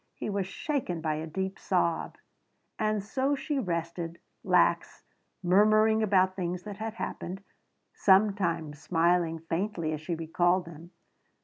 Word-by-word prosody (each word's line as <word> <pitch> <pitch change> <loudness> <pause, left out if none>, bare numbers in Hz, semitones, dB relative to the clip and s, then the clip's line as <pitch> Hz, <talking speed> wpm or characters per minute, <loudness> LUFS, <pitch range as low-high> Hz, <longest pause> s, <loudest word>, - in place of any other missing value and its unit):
He - - -4
was 195 -2 -1
shaken 235 - -3
by 155 -1 -1
a 160 +1 -5
deep 190 +4 -4
sob. 170 -3 0 0.6
And 215 -2 0
so 265 +7 0
she 280 +1 -2
rested, 170 -4 -3 0.3
lax, - - +2 0.4
murmuring 215 +4 +4
about 190 -3 +3
things 180 -1 -3
that 205 -2 -7
had 220 +1 -5
happened, 190 -3 -5 0.5
sometimes 190 -7 +2
smiling 170 0 +2
faintly 165 0 -2
as 155 - -4
she 165 +2 -3
recalled 175 +3 +1
them. 170 0 -11
180 Hz, 130 wpm, -29 LUFS, 165-210 Hz, 0.6 s, murmuring